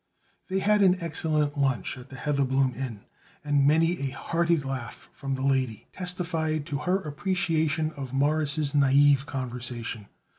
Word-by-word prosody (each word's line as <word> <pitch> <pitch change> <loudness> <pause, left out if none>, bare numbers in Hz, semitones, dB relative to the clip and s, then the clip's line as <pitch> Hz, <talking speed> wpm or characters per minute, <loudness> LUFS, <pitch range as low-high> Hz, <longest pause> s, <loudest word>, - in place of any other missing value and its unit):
They 190 - 0
had 210 +2 +3
an 185 -2 +5
excellent 155 -3 -1
lunch 130 -7 0
at 130 0 -12
the - - -10
Heatherbloom 135 -2 +1
Inn, 120 -5 -5 0.4
and 145 -1 +3
many 165 +4 +3
a 140 - -1
hearty 170 +4 0
laugh 135 -4 -6
from 135 -1 -3
the 130 - -4
lady 130 -5 0
testified 165 -4 -2
to 145 -3 -3
her 180 +5 +1
appreciation 160 -2 0
of 140 -4 -7
Morris' 145 +1 +1
naïve 140 0 +4
conversation. 120 -4 -5
145 Hz, 145 wpm, -27 LUFS, 135-160 Hz, 0.4 s, an